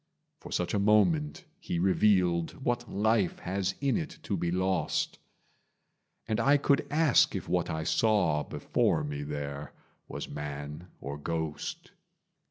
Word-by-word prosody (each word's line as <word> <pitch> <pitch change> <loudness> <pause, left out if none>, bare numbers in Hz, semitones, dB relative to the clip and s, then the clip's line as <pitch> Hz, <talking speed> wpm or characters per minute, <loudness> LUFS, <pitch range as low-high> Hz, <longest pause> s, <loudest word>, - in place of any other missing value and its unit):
For - - -11
such 90 - -1
a 105 - +2
moment 150 - +2
he 90 - -3
revealed 90 -2 +3
What 120 0 -1
life 105 -2 +2
has 95 +1 -2
in 140 -2 +2
it 160 -3 -5
to 100 - -1
be 85 -1 -1
lost; 95 -2 0 1.1
And 110 +1 0
I 140 +5 +5
could 140 0 +2
ask 150 -2 +4
if - - -4
what - - 0
I 80 0 -2
saw, 90 -7 +2
Before - - 0
me 75 -1 -4
there, 75 0 -5 0.3
was - - -6
man 75 +3 -6
or 70 +1 -6
ghost. 80 -1 -4
95 Hz, 140 wpm, -29 LUFS, 75-115 Hz, 1.1 s, I